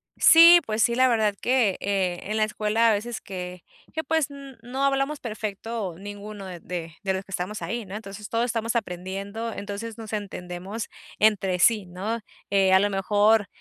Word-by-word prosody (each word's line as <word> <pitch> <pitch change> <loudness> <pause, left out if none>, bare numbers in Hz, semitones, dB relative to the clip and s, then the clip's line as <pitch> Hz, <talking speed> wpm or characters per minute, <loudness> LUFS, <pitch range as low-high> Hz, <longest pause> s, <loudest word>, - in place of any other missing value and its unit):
Sí, 335 +1 +9
pues 220 0 -1
sí, 235 - +3
la 260 +1 +5
verdad 220 -4 +2
que, 240 -6 +2
eh, 190 -3 -1
en 215 +2 -3
la 215 - +3
escuela 215 +2 +2
a - - +5
veces 230 +3 -3
que, 180 -2 -7 0.3
que 320 - -2
pues 315 -1 0
n 275 -2 -10
no 260 +3 -3
hablamos 275 +2 +1
perfecto 215 -3 -4
ninguno 205 0 -8
de 180 -2 -8 0.4
de 190 - 0
los 190 +1 -3
que 195 - -17
estamos 185 +4 -3
ahí, 230 -1 -3
¿no? 190 +1 -8
Entonces 210 0 -8
todos 230 +1 0
estamos 230 -1 -2
aprendiendo, 200 +2 -4
entonces 205 +2 -6
nos 220 -1 -8
entendemos 195 +1 -5 0.3
entre 195 -4 +3
sí, 210 0 +4
¿no? 195 +6 -4 0.3
Eh, 195 -1 +4
a 190 - +7
lo 205 +1 +2
mejor, 205 +2 +3
210 Hz, 180 wpm, -25 LUFS, 195-230 Hz, 0.4 s, Sí